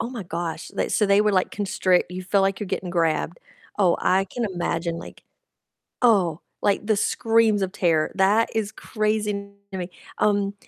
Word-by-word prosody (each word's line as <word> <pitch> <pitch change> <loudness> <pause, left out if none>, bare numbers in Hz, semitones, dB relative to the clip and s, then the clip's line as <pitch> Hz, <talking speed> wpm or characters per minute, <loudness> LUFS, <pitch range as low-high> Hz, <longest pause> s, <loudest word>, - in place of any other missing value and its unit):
oh - - -2
my 245 -4 -6
gosh, 170 -2 -5
like, - - -1
so 210 - +2
they 200 +1 +4
would, 210 -1 +2
like, 185 - +2
constrict 185 -3 +1
You 185 +1 -5
feel 195 +2 +1
like 195 +1 0
you're 210 - -3
getting 185 - -3
grabbed. 165 -1 0 0.4
Oh, 180 -4 +4
I 190 +1 +2
can 235 +5 -4
imagine, 170 -2 -2
like - - -11 0.8
oh, 190 -9 +3 0.2
like, 205 0 +1
the 215 -1 +2
screams 225 -1 +2
of 190 -1 -1
terror. 165 -6 +1
That 200 +4 +3
is 215 -1 -1
crazy 215 -1 -1
n 200 0 -7 0.2
to 190 - -5
me. 180 -1 -4 0.3
Um, 205 -1 +1
195 Hz, 185 wpm, -24 LUFS, 180-210 Hz, 0.8 s, they